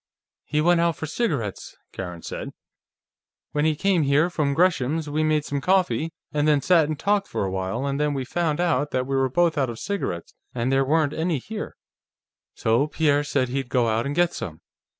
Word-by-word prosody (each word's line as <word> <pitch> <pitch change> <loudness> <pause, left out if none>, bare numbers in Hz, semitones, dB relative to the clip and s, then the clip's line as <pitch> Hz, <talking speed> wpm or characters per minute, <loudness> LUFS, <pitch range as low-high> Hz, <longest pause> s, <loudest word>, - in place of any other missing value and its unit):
"He 150 0 0
went 170 +1 +4
out 170 -1 +2
for 160 - -5
cigarettes," 150 - -3
Karen 90 -3 -7
said. - - -6 1.0
"When 150 +1 0
we 155 -1 +2
came 190 +1 +2
here 150 +4 +3
from 145 -5 0
Greshams', 160 -3 +1
we 150 +2 0
made 155 -1 +1
some 140 -1 -2
coffee, 165 -4 +1 0.2
and 150 0 +1
then 150 -2 +4
sat 165 +2 +4
and 155 0 -3
talked 200 +2 +1
for - - -2
a 95 - -3
while, 95 +7 -2
and 140 0 -1
then 150 -1 +1
we 135 -2 -2
found 160 +2 -1
out 165 -4 +1
that 130 -2 -1
we 135 +1 -2
were 135 0 +2
both 165 +2 +2
out 135 -3 +1
of 115 - -6
cigarettes 145 - -4 0.2
and 120 +2 0
there 135 0 +3
weren't 150 +1 +2
any 165 -1 0
here. 210 - -6 0.8
So 115 +6 +2
Pierre 145 -2 +2
said 135 -3 0
he'd 135 0 -3
go 125 -3 +2
out 115 +3 0
and 145 - -3
get 175 0 +2
some. 80 -2 -6
145 Hz, 205 wpm, -24 LUFS, 130-165 Hz, 1.0 s, went